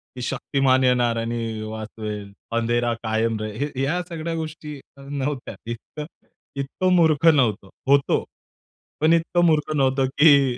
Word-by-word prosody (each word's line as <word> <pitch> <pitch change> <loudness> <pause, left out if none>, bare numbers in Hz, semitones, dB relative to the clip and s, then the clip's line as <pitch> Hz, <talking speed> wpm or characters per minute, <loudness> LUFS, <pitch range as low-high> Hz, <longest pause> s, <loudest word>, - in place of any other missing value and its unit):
की 125 - -6
शक्तिमान 130 +1 +1
येणार 120 -2 +2
आणि 115 -1 -3
वाचवेल. 110 -1 -6 0.3
अंधेरा 120 0 +1
कायम 110 0 0
रहे 110 0 -5
हे 135 -3 -5
या 175 +6 0
सगळ्या 165 0 -4
गोष्टी 155 -2 -6 0.2
नव्हत्या. 140 -3 -4 0.2
इतकं 150 +6 -7 0.5
इतकं 140 +7 0
मूर्ख 160 -2 +3
नव्हतो. 115 - +3 0.2
होतो 140 0 +3 0.8
पण 160 +2 +5
इतकं 175 +1 +2
मूर्ख 155 -2 +2
नव्हतो, 135 -1 +2
की 140 -2 +4
135 Hz, 130 wpm, -23 LUFS, 115-150 Hz, 0.8 s, पण